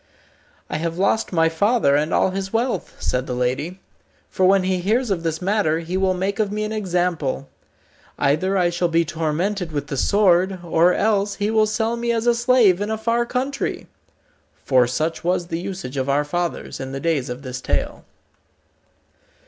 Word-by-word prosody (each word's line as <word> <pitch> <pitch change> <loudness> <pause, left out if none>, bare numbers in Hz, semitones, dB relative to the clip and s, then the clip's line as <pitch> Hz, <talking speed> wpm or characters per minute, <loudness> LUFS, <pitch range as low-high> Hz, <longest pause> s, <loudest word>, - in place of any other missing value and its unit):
"I - - -3
have 165 +1 -3
lost 200 +4 +1
my 165 -2 +3
father 165 - +2
and 150 +3 0
all 190 - +2
his 190 0 -4
wealth," 235 +2 -1
said 125 +1 -1
the 125 - -3
lady, 130 +9 -2 0.5
"for 185 - +2
when 195 0 +4
he 185 0 0
hears 220 +6 0
of 180 -4 0
this 165 +1 -3
matter 195 -5 +1
he 170 +2 -4
will 190 0 +1
make 195 +3 -2
of 210 -2 +1
me 210 +1 -2
an 215 - -3
example. 175 -9 -1 0.7
Either 155 +8 +1
I 175 -2 +2
shall 175 0 0
be 165 0 +2
tormented 165 +4 -2
with 145 -2 -3
the 140 - -3
sword, 190 +2 +3
or 170 +1 +3
else 205 0 +1
he 205 +1 -1
will 220 -1 +3
sell 225 +2 -1
me 235 0 -1
as 230 0 -1
a 240 - +5
slave 235 -6 +3
in 205 - -2
a 220 - -1
far 235 +2 0
country." 265 +3 -2 0.8
(For 130 -3 +4
such 155 +5 -2
was 175 0 0
the 165 - -2
usage 180 -8 -6
of 130 +1 -1
our 145 +2 +2
fathers 175 +3 -3
in 135 0 -6
the 135 - -3
days 150 -5 -1
of 125 +3 -6
this 130 -1 -6
tale). - - -2
180 Hz, 190 wpm, -21 LUFS, 160-210 Hz, 0.8 s, a